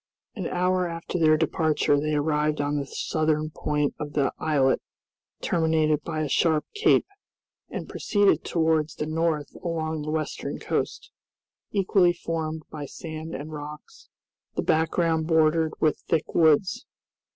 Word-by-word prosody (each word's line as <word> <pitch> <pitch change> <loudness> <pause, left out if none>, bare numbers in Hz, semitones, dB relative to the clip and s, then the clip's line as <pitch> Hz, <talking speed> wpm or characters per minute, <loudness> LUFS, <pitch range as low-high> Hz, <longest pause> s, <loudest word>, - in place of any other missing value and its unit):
An 190 -6 -4
hour 180 0 +1
after 170 +1 -4
their 155 -1 +5
departure 155 -2 +2
they 155 +1 -1
arrived 150 0 +1
on 145 0 0
the 140 -1 -3
southern 155 +1 -1
point 150 -1 -1
of 150 -1 -5
the 140 -2 +1
islet, 140 -4 +2 0.6
terminated 160 -2 +2
by 155 -2 -3
a - - -1
sharp 155 +2 +2
cape, 420 - +3 0.6
and - - -5
proceeded 205 -2 +2
towards 160 -2 +1
the 150 - -3
north 155 -1 -1
along 160 -2 -2
the 150 - -5
western 155 0 -3
coast, - - -3 0.6
equally 190 -3 +3
formed 160 -2 -4
by 145 -2 -6
sand 160 +2 -7
and 150 +3 -7
rocks, 150 0 -9 0.5
the - - -1
background 160 0 +1
bordered 160 -1 +3
with 155 - +2
thick 160 -1 0
woods. 170 - +3
155 Hz, 140 wpm, -26 LUFS, 150-165 Hz, 0.6 s, their